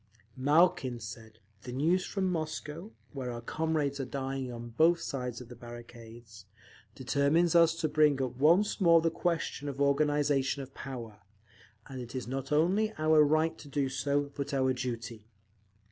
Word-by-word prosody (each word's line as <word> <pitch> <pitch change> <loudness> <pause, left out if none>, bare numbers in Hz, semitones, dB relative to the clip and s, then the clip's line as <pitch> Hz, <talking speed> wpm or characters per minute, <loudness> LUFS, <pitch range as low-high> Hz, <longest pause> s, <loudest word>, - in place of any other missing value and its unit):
_ - - -36 0.3
Malkin 140 -3 +2
said, 110 0 -10 0.2
"The 125 - -8
news 165 +8 +1
from 195 -2 -2
Moscow, 160 +1 -4 0.2
where 130 -3 -4
our 120 - -5
comrades 150 +2 -1
are 135 - -2
dying 135 -1 -4
on 120 0 -7
both 165 +8 +3
sides 125 -6 -4
of 125 - -10
the 120 - -11
barricades, 115 -3 -12 0.5
determines 145 +6 +2
us 165 -1 +5
to 165 - -1
bring 150 -2 +3
up 130 -2 -2
once 175 +10 +3
more 170 -2 +6
the 165 0 +1
question 165 -4 -2
of 140 0 -7
organisation 140 -1 +1
of 135 0 -13
power, 115 -6 -8 0.6
and 130 -1 -7
it 120 +1 -9
is 130 - -4
not 135 +2 -4
only 185 +8 +2
our 155 0 +5
right 155 +2 +2
to 145 - -11
do 140 -1 -1
so, 140 +2 -1
but 140 0 -3
our 130 -1 +2
duty…. 115 -3 -5
140 Hz, 165 wpm, -30 LUFS, 125-155 Hz, 0.6 s, more